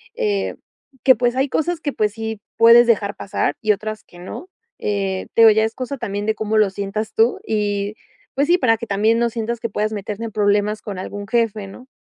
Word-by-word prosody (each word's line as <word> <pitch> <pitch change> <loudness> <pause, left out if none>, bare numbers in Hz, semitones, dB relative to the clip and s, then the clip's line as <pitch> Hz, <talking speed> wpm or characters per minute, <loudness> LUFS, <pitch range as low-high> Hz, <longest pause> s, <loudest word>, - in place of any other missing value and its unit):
eh, 100 -3 -1 0.5
que 260 - +7
pues, 245 0 0
hay 270 +2 +2
cosas 340 +4 -1
que 290 -3 -3
pues, 210 -1 0
sí 220 -1 -5 0.2
puedes 235 +1 +8
dejar 205 -3 +1
pasar 200 - -2
y 215 -1 +3
otras 215 +1 -3
que 175 - -17
no, 265 - -8 0.3
eh, 195 -2 -2
te 230 - +5
digo, 225 - +9
ya 220 +1 +3
es 220 +1 -1
cosa 260 +2 -4
también 205 -3 -4
de 220 0 0
cómo 220 0 -1
lo 210 -2 +4
sientas 200 +2 -4
tú, 225 +2 +2
y 205 -1 -1 0.4
pues 280 +2 +1
sí, 350 - +5
para 240 -9 +3
que 230 +1 -7
también 215 +3 +2
no 235 0 +2
sientas 230 0 -3
que 230 - -2
puedas 215 +1 -2
meterte 210 +2 -5
en 225 - -6
problemas 210 0 +1
con 195 -3 -6
algún 205 +2 -6
jefe, 220 -3 0
¿no? 250 +7 -13
215 Hz, 220 wpm, -20 LUFS, 205-235 Hz, 0.5 s, digo